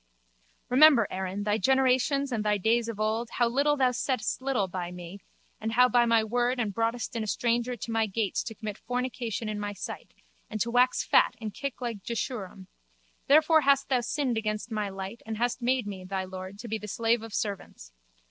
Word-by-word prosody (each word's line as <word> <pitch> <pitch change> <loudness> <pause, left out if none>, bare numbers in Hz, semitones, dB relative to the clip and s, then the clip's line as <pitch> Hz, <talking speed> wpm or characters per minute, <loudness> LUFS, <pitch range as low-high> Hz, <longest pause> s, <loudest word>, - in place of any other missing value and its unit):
Remember, 265 -4 +6
Erin, 190 +2 -3
thy 210 +1 +1
generations 265 +4 +2
and 225 -3 -1
thy 210 -1 +2
days 225 +4 +1
of 220 -2 -6
old, 220 +2 0
how 240 - +2
thou 275 0 +2
settedst 250 -1 -2
little 260 -7 0
by 180 -1 -4
me 180 +2 -9 0.4
and 220 +1 -3 0.2
by 240 -1 +4
my 230 -1 +4
word 245 +3 0
and 215 -4 -1
broughtedst 230 +3 -2
in 230 - -1
a 215 - -3
stranger 240 +3 0
to 230 - -6
my 225 -1 +1
gates 205 0 -1
to 225 - -6
commit 210 0 -6
fornication 245 -3 -3
in 210 -1 -3
my 205 0 -3
sight 195 - -8 0.3
and 215 - -4
to 235 +3 0
wax 250 +1 +3
fat - - +4
and 215 -3 -5
kick 275 -2 -5
like 230 -5 -4
Jeshurum. 200 -4 -5 0.6
Therefore 310 +2 +6
hast 275 -1 +3
thou 255 -2 +2
sinned 250 -1 -1
against 215 +1 -3
my 210 -2 -1
light 195 +3 -7
and 220 0 -5
hast 240 +2 -1
made 250 -1 +1
me, 195 -2 -6
thy 190 0 -3
lord, 185 +1 -8
to 235 +3 -8
be 220 0 -2
the 210 - -8
slave 230 +2 +1
of 225 0 -9
servants. 200 - -5
225 Hz, 195 wpm, -28 LUFS, 205-250 Hz, 0.6 s, Remember